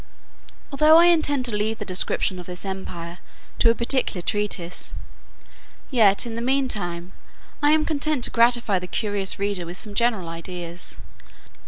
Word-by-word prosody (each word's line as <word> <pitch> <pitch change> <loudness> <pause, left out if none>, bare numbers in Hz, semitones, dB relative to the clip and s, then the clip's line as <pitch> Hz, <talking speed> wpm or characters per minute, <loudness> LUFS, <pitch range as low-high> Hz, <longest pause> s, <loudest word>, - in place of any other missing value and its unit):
Although 305 +3 +6
I 340 - +7
intend 300 -6 +2
to 235 -4 -3
leave 215 +2 -1
the 210 - -6
description 185 0 0
of 180 - -10
this 180 +2 -7
empire 175 -3 -6 0.4
to 230 - +5
a 230 - +3
particular 235 -7 -1
treatise, 200 -4 -2 1.0
yet, 215 -6 +4
in 235 - -5
the 230 - -4
mean 265 +2 +1
time, 175 -5 -4 0.5
I 290 - +4
am 310 0 +2
content 300 -3 -1
to - - +2
gratify 235 -4 +3
the 180 - -7
curious 205 -1 0
reader 200 -2 -1
with 175 +2 -7
some 210 +1 0
general 215 -5 0
ideas. 170 +1 -7
210 Hz, 160 wpm, -23 LUFS, 180-245 Hz, 1.0 s, I